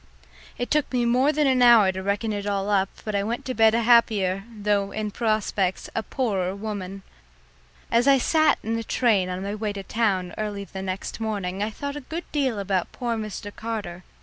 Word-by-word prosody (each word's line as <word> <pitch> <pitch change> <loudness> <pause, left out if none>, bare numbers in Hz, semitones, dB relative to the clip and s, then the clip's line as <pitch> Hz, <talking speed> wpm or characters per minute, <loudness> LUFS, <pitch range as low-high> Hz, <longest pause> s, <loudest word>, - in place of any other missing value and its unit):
It 245 - -4
took 300 -1 +1
me 245 -2 +1
more 255 +5 +3
than 300 0 +1
an 260 -2 +3
hour 230 -5 +7
to 190 0 -5
reckon 205 +3 -1
it 205 0 -4
all 200 0 -1
up, 195 -1 +2 0.2
but 215 - -3
I 200 - +1
went 230 +4 -3
to 255 - -2
bed 225 -1 +4
a 235 - +1
happier, 210 -5 +3
though 205 -2 0
in 215 -1 -3
prospects 215 -4 -1
a - - 0
poorer 195 -7 -1
woman. 200 -2 -6 0.9
As 235 +3 +3
I 275 -1 +7
sat 310 +4 +3
in 225 +1 -1
the 230 - -3
train 210 -6 +2
on 185 +1 -4
my 200 +1 -3
way 210 -1 -3
to 200 -1 -6
town 190 -5 0
early 205 -2 -3
the 190 -1 -8
next 190 +3 -4
morning 200 -4 -3
I 210 - 0
thought 280 +6 -5
a 295 - -5
good 325 +6 -6
deal 270 -7 0
about 195 -2 -1
poor 240 -2 -2
Mr. 210 -2 -6
Carter. 210 -6 -5
215 Hz, 205 wpm, -25 LUFS, 195-235 Hz, 0.9 s, hour